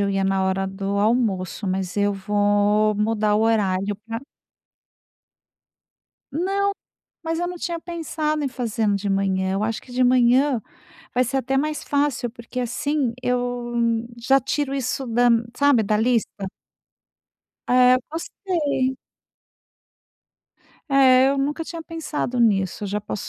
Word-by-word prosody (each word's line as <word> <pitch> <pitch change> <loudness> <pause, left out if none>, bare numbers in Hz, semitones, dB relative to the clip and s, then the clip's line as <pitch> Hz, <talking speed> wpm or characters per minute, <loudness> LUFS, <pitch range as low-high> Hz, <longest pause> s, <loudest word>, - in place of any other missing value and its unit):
eu 200 0 +1
ia 195 0 0
na 195 0 +1
hora 190 0 0
do 195 +1 -3
almoço, 210 -3 0
mas 185 0 -2
eu 205 0 +2
vou 205 +1 +2
mudar 210 0 +1
o 215 - +2
horário 205 -3 +1
pra 225 +1 -4 2.1
Não, 390 +6 0 0.5
mas 325 0 -2
eu 350 - -1
não 360 - -5
tinha 340 0 -3
pensado 315 -3 -3
em - - +1
fazendo 225 -5 -1
de 200 0 -3
manhã, 190 -1 0
eu 200 +2 -1
acho 225 0 -2
que 250 - -15
de 250 +1 +1
manhã 250 +1 +4 0.5
vai 250 +1 +3
ser 265 +3 -1
até 270 +1 0
mais 305 +2 -1
fácil, 285 -4 0
porque 235 +2 -8
assim 250 +1 -1
eu 245 -1 -1 0.4
já 260 +3 +3
tiro 275 +2 -2
isso 265 0 -2
da, 240 +1 +3 0.3
sabe, 285 -5 +4
da 210 0 +1
lista. 230 +1 +2 1.4
É, 250 0 +6
gostei. 315 - -2 1.9
É, 265 -1 +6
eu 275 0 0
nunca 295 +4 -1
tinha 335 0 -7
pensado 305 -6 -3
nisso. 200 -3 +1
Eu - - -3
já 210 +1 -2
posso 205 -1 -5
245 Hz, 140 wpm, -23 LUFS, 205-275 Hz, 2.1 s, É